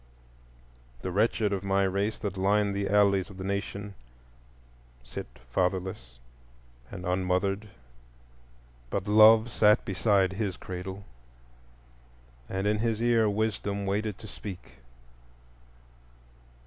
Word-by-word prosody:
The 95 Hz, -, -3 dB
wretched 105 Hz, +1 st, +1 dB
of 95 Hz, -1 st, -3 dB
my 100 Hz, 0 st, +2 dB
race 100 Hz, +3 st, 0 dB
that 100 Hz, -2 st, -4 dB
line 100 Hz, +1 st, +2 dB
the 100 Hz, 0 st, -2 dB
alleys 100 Hz, -1 st, +3 dB
of 95 Hz, -, -12 dB
the 95 Hz, -, -6 dB
nation 100 Hz, +1 st, -4 dB, 1.1 s
sit -, -, -7 dB, 0.2 s
fatherless 90 Hz, -7 st, -2 dB, 0.7 s
and 95 Hz, -1 st, -8 dB
unmothered; 95 Hz, +3 st, 0 dB, 1.2 s
but 100 Hz, +6 st, -3 dB
Love 110 Hz, +2 st, +7 dB
sat 105 Hz, -1 st, +4 dB
beside 95 Hz, -1 st, +2 dB
his 100 Hz, -2 st, -3 dB
cradle, 95 Hz, +2 st, -7 dB, 1.4 s
and 95 Hz, +1 st, -2 dB
in 105 Hz, 0 st, +1 dB
his 115 Hz, -1 st, 0 dB
ear 115 Hz, -2 st, +3 dB
Wisdom 100 Hz, -1 st, -2 dB
waited 105 Hz, +1 st, -1 dB
to 110 Hz, -, -11 dB
speak. 90 Hz, -, -9 dB
100 Hz, 110 wpm, -28 LUFS, 95-105 Hz, 1.4 s, Love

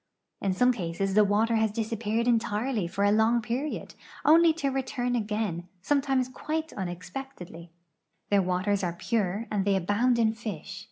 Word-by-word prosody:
In 195 Hz, -2 st, 0 dB
some 250 Hz, +7 st, +4 dB
cases 190 Hz, -2 st, -2 dB
the 210 Hz, +1 st, +6 dB
water 215 Hz, +3 st, +2 dB
has 220 Hz, 0 st, +2 dB
disappeared 225 Hz, +1 st, -1 dB
entirely 225 Hz, -2 st, 0 dB
for 190 Hz, +3 st, -2 dB
a 205 Hz, -, +4 dB
long 220 Hz, +3 st, +3 dB
i)eriod, 245 Hz, +6 st, -4 dB, 0.3 s
only 330 Hz, +2 st, +7 dB
to 290 Hz, -4 st, -1 dB
return 255 Hz, -2 st, -2 dB
again, 210 Hz, -6 st, -2 dB, 0.2 s
sometimes 270 Hz, -1 st, +1 dB
(piite 315 Hz, +4 st, -4 dB
unexpectedly. 180 Hz, -1 st, -7 dB, 0.6 s
'I'heir 200 Hz, -1 st, +5 dB
waters 190 Hz, +2 st, 0 dB
are 175 Hz, -2 st, -1 dB
pure 205 Hz, +2 st, -1 dB
and 205 Hz, -2 st, +1 dB
they 200 Hz, 0 st, +2 dB
abound 205 Hz, +7 st, +2 dB
in 220 Hz, -1 st, +3 dB
fish. 200 Hz, -5 st, -6 dB
220 Hz, 155 wpm, -27 LUFS, 195-245 Hz, 0.6 s, only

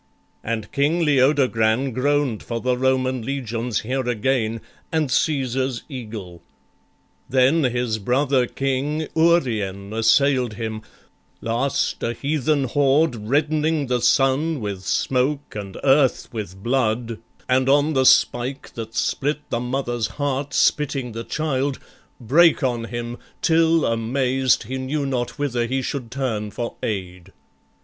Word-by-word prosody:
And 110 Hz, -1 st, -3 dB
King 155 Hz, +5 st, +1 dB
Leodogran 130 Hz, -3 st, +2 dB
Groan'd 140 Hz, -2 st, 0 dB
for 115 Hz, -1 st, -4 dB
the 125 Hz, +1 st, 0 dB
Roman 130 Hz, 0 st, +1 dB
legions 120 Hz, -3 st, -3 dB
here 130 Hz, +2 st, -2 dB
again, 115 Hz, -1 st, 0 dB, 0.3 s
And 155 Hz, -3 st, 0 dB
Cæsar's 130 Hz, -4 st, 0 dB
eagle: 105 Hz, -, -8 dB, 0.9 s
then 135 Hz, +4 st, +3 dB
his 120 Hz, -3 st, -1 dB
brother 130 Hz, +3 st, +1 dB
king, 140 Hz, +4 st, -2 dB
Urien, 110 Hz, -, +1 dB
assail'd 125 Hz, +2 st, +3 dB
him: 110 Hz, -1 st, -4 dB, 0.6 s
last 120 Hz, +4 st, -1 dB
a 115 Hz, -, -1 dB
heathen 145 Hz, +2 st, 0 dB
horde, 135 Hz, -3 st, +1 dB
Reddening 150 Hz, +1 st, +1 dB
the 125 Hz, -1 st, -1 dB
sun 140 Hz, +5 st, +2 dB
with 100 Hz, -4 st, -4 dB
smoke 135 Hz, +3 st, 0 dB
and 100 Hz, -2 st, -6 dB
earth 135 Hz, -1 st, +3 dB
with 95 Hz, -4 st, -6 dB
blood, 115 Hz, -2 st, 0 dB, 0.3 s
And 130 Hz, +1 st, +2 dB
on 145 Hz, +3 st, +3 dB
the 130 Hz, -2 st, +3 dB
spike 125 Hz, +3 st, +2 dB
that 115 Hz, -1 st, -7 dB
split 150 Hz, +1 st, -1 dB
the 115 Hz, -, 0 dB
mother's 120 Hz, -2 st, -2 dB
heart 145 Hz, -1 st, -2 dB
Spitting 135 Hz, -4 st, +1 dB
the 115 Hz, +1 st, -5 dB
child, 140 Hz, -2 st, -1 dB, 0.4 s
brake 155 Hz, +7 st, +4 dB
on 120 Hz, -3 st, 0 dB
him, 120 Hz, +1 st, -5 dB, 0.2 s
till, 165 Hz, -1 st, +3 dB
amazed, 125 Hz, +3 st, +1 dB
He 130 Hz, +4 st, -5 dB
knew 140 Hz, +3 st, -2 dB
not 125 Hz, -2 st, -2 dB
whither 125 Hz, -5 st, -1 dB
he 130 Hz, +2 st, -1 dB
should 125 Hz, -4 st, -4 dB
turn 115 Hz, -5 st, -2 dB
for 115 Hz, +3 st, -5 dB
aid. 95 Hz, -3 st, -5 dB
130 Hz, 125 wpm, -22 LUFS, 115-140 Hz, 0.9 s, brake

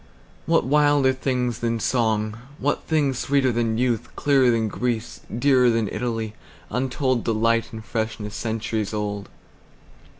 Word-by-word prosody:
What -, -, +3 dB
wilder 145 Hz, -1 st, +4 dB
things 125 Hz, -3 st, -1 dB
than 115 Hz, -1 st, -1 dB
song, 110 Hz, -2 st, 0 dB, 0.2 s
what 145 Hz, -, -1 dB
thingsSweeter 140 Hz, -3 st, +2 dB
than 115 Hz, -1 st, 0 dB
youth, 120 Hz, -2 st, 0 dB
clearer 135 Hz, -3 st, +3 dB
than 115 Hz, -2 st, +2 dB
Greece, 120 Hz, +1 st, -3 dB
Dearer 125 Hz, +1 st, +3 dB
than 115 Hz, -2 st, +1 dB
Italy, 115 Hz, -3 st, -3 dB, 0.4 s
untoldDelight, 115 Hz, -3 st, +1 dB
and 110 Hz, -1 st, -8 dB
freshness 110 Hz, -2 st, -3 dB
centuries 110 Hz, -1 st, -2 dB
old? 105 Hz, -1 st, -3 dB
115 Hz, 120 wpm, -23 LUFS, 110-130 Hz, 0.4 s, wilder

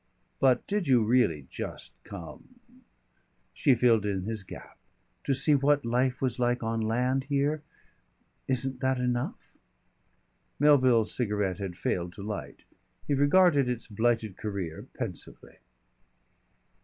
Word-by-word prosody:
"But 130 Hz, -2 st, +3 dB
did 200 Hz, -4 st, -1 dB
you 125 Hz, -4 st, +4 dB
really 105 Hz, -, +2 dB
just -, -, -6 dB
come 85 Hz, -, -10 dB, 0.4 s
?" -, -, -42 dB
She 135 Hz, -5 st, +3 dB
filled 115 Hz, -3 st, +3 dB
in 100 Hz, -3 st, -2 dB
his 110 Hz, +1 st, -4 dB
gap. 95 Hz, -, -12 dB, 0.5 s
"To 135 Hz, -, +1 dB
see 150 Hz, +3 st, +3 dB
what 145 Hz, 0 st, +3 dB
life 125 Hz, +2 st, 0 dB
was 125 Hz, -2 st, 0 dB
like 120 Hz, 0 st, +1 dB
on 115 Hz, 0 st, -1 dB
land 125 Hz, +4 st, 0 dB
here?... 145 Hz, +2 st, 0 dB, 0.9 s
Isn't 130 Hz, 0 st, -1 dB
that 130 Hz, 0 st, +1 dB
enough?" 125 Hz, -1 st, -2 dB, 1.1 s
Melville's 130 Hz, -6 st, +4 dB
cigarette 105 Hz, -6 st, -1 dB
had 95 Hz, -3 st, -5 dB
failed 90 Hz, -2 st, -2 dB
to 100 Hz, -, -9 dB
light. 105 Hz, 0 st, -6 dB, 0.4 s
He 145 Hz, -, 0 dB
regarded 145 Hz, -1 st, +4 dB
its 120 Hz, -2 st, -3 dB
blighted 110 Hz, -2 st, 0 dB
career 95 Hz, -6 st, -5 dB
pensively. -, -, -7 dB
125 Hz, 130 wpm, -28 LUFS, 105-135 Hz, 1.1 s, you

